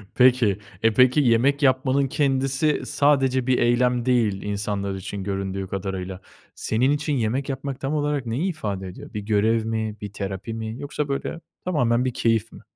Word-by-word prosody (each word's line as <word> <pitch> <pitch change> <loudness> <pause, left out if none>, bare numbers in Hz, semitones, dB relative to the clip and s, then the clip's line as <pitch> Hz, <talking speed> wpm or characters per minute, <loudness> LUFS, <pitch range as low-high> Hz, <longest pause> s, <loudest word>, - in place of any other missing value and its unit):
Peki, 125 -6 +4 0.2
eee, 115 -1 +4
peki, 125 +5 +5
yemek 135 +3 +3
yapmanın 130 +1 +3
kendisi 135 +2 +1
sadece 135 -3 +2
bir 130 - +3
eylem 120 0 +2
değil 115 -6 +2
insanlar 100 -1 -2
için, 95 +1 -5
göründüğü 95 -1 -3
kadarıyla, 95 -1 -4 0.3
senin 125 +5 +1
için 150 0 0
yemek 130 +3 -1
yapmak 135 0 -4
tam 135 +3 -2
olarak 145 -3 0
neyi 135 +12 -1
ifade 100 - -4
ediyor? 90 - -10
Bir 105 - -3
görev 110 +2 +1
mi, 110 -1 -2
bir 105 -1 -6
terapi 100 +2 -5
mi 110 +2 -5
yoksa, 145 0 -3
böyle, 140 +4 -3 0.3
tamamen 125 -8 +2
bir 125 - -1
keyif 115 -1 +1
mi? - - -13
120 Hz, 165 wpm, -24 LUFS, 105-135 Hz, 0.3 s, peki